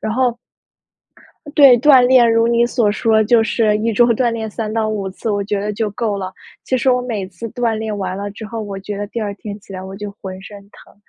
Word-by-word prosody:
然 215 - -3
后 245 -1 +1 1.2
对， 270 -5 +7
锻 270 0 +6
炼， 245 -3 +5
如 230 +1 +3
你 235 0 +3
所 240 -3 +1
说， 220 +1 +2
就 225 +1 +3
是 215 -1 +1
一 225 +2 -1
周 240 +3 +4
锻 240 0 +1
炼 225 -1 -4
3 215 0 -4
到 220 -1 0
5 200 -3 -3
次， 220 - -6
我 205 -1 -1
觉 205 0 -2
得 210 - -2
就 210 0 -2
够 210 -1 -2
了。 190 -1 -5 0.3
其 260 - 0
实 260 +1 +2
我 250 0 +1
每 220 -6 -4
次 190 +4 -8
锻 235 -1 -1
炼 215 -1 -4
完 190 -2 -3
了 200 0 -5
之 215 +2 -9
后， 225 0 -5
我 200 -2 -6
觉 205 +1 -6
得 205 0 -4
第 230 - -5
二 205 -2 -3
天 205 0 -8
起 - - -22
来 185 - -6
我 190 0 -8
就 205 +1 -6
浑 190 -2 -9
身 205 +1 -10
疼， - - -18
215 Hz, 255 characters per minute, -18 LUFS, 205-235 Hz, 1.2 s, 对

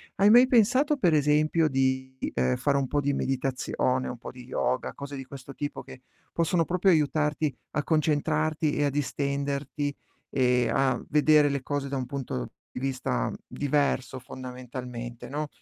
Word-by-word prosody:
Hai 200 +2 +5
mai 245 +3 +8
pensato 255 +5 +4
per 180 - +2
esempio 155 +2 +3
di, 130 -1 0 0.2
ehm, 65 0 +1
fare 140 -1 +1
un 135 -2 0
po' 145 +1 0
di 140 0 0
meditazione, 130 -1 -1
un 125 - -5
po' 115 - -8
di 125 -1 -12
yoga, 130 0 -1
cose 140 0 -7
di 135 - -7
questo 135 +1 -10
tipo 145 +1 -4
che 130 - -12 0.3
possono 170 0 +1
proprio 180 +2 +2
aiutarti 150 -2 +2 0.2
a 150 - -1
concentrarti 155 0 +1
e 145 - +2
a - - +2
distenderti, 140 0 -2 0.4
e 125 -2 +2
a 130 -2 +2
vedere 150 -1 +5
le 140 -1 -1
cose 145 -1 -2
da 140 - -2
un 130 - -2
punto 125 - -4 0.2
di - - -6
vista 130 - -1
diverso 140 -2 0
fondamentalmente, 125 -2 -7
no, 150 +2 -3
140 Hz, 160 wpm, -27 LUFS, 130-150 Hz, 0.4 s, mai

